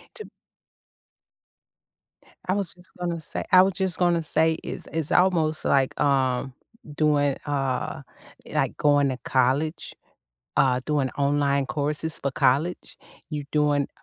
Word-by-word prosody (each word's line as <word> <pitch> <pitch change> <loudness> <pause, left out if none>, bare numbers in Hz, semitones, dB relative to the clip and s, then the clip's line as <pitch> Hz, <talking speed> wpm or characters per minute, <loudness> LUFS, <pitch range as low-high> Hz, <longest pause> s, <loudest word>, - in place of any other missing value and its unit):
To 435 - -8 2.2
I 185 - +2
was 200 -2 -2
just 180 +1 -19
gonna 170 -2 -2
say - - -5
I 185 0 +8
was 190 0 +2
just 190 -3 -1
gonna 175 -2 +2
say 160 +1 +2
is - - -6
it's 160 -2 -2
almost 165 -4 +2
like, 135 -1 +1
um, 135 -2 +1 0.4
doing, 145 -3 +2
uh 135 -3 -2 0.5
like, - - -1
going 145 -2 +3
to 130 - -3
college, 135 +5 0 0.6
uh, 130 -2 +3
doing 145 -4 0
online 140 -1 +1
courses 150 +2 -1
for 140 - -2
college. 140 +7 0 0.3
You 150 -2 -4
doing, 145 -2 +2
150 Hz, 130 wpm, -25 LUFS, 140-165 Hz, 2.2 s, I